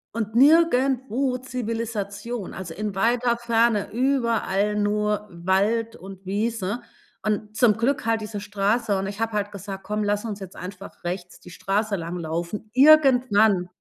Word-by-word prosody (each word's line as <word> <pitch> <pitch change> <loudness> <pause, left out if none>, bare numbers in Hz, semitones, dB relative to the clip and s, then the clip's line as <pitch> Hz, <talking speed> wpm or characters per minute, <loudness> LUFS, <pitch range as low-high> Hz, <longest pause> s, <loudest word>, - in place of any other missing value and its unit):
Und 220 -2 -3
nirgendwo 265 -3 +3
Zivilisation, 230 -3 -4
also 180 -3 -7
in 210 +2 -4
weiter 235 +4 +2
Ferne, 230 -2 +1
überall 230 -5 +1
nur 210 0 0
Wald 200 +6 0
und 190 0 -11
Wiese 210 +2 -2 0.4
und 215 +1 -2
zum 225 -3 +5
Glück 240 +4 0
halt 225 -1 +1
diese 210 -1 -5
Straße, 205 +1 0
und 190 0 -2
ich 200 +1 -7
habe 225 0 -1
halt 205 -1 -1
gesagt: 195 -1 -7
„Komm, 210 +1 -2
lass 205 0 0
uns 215 -3 -5
jetzt 190 -2 -9
einfach 195 +1 -9
rechts 175 0 -5
die - - -13
Straße 200 +3 -1
langlaufen.“ 170 +4 -4
Irgendwann 250 -9 +5
210 Hz, 145 wpm, -24 LUFS, 195-235 Hz, 0.4 s, zum